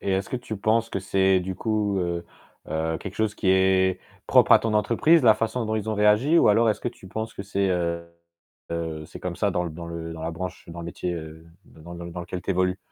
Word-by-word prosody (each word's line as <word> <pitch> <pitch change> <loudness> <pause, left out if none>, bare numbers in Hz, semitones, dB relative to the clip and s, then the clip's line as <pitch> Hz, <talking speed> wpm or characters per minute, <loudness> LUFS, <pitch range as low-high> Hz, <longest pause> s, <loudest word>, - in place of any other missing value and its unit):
Et 95 - -1
est-ce 95 +1 -1
que - - -1
tu 120 -3 -6
penses 110 +3 +1
que - - -2
c'est 95 0 +2
du 95 +1 -4
coup, 105 -2 0
heu 85 -1 -2 0.4
heu, 80 +1 -1
quelque 95 -2 -7
chose 110 -1 0
qui 95 - -2
est 95 0 +3 0.3
propre - - +5
à - - +9
ton 115 -1 -2
entreprise, 130 +9 +4
la 110 -3 +7
façon 115 +2 -2
dont 110 - -2
ils 110 0 -3
ont - - -1
réagi 105 +10 +4
ou - - +5
alors 115 +2 +4
est-ce - - -3
que - - -1
tu 110 -5 -13
penses 110 +2 -4
que 100 - -6
c'est, 100 -1 -1
heu, 85 -1 -1 1.0
c'est - - -11
comme 90 -2 -4
ça 105 - +1
dans 90 -1 -1
l 85 - -6
dans 85 +1 -7
le 85 -1 -6
dans 80 - -8
la 80 - -2
branche, 90 +2 -6
dans 85 +1 -7
le 85 - -7
métier, 85 +1 -3
heu, 80 0 -9 0.2
d - - -18
dans 85 +1 -10
l 85 - -8
dans 85 - -7
l 85 - -8
dans 90 - -5
lequel 90 +1 -6
tu - - -3
évolues? 90 0 +1
95 Hz, 265 wpm, -25 LUFS, 85-110 Hz, 1.0 s, à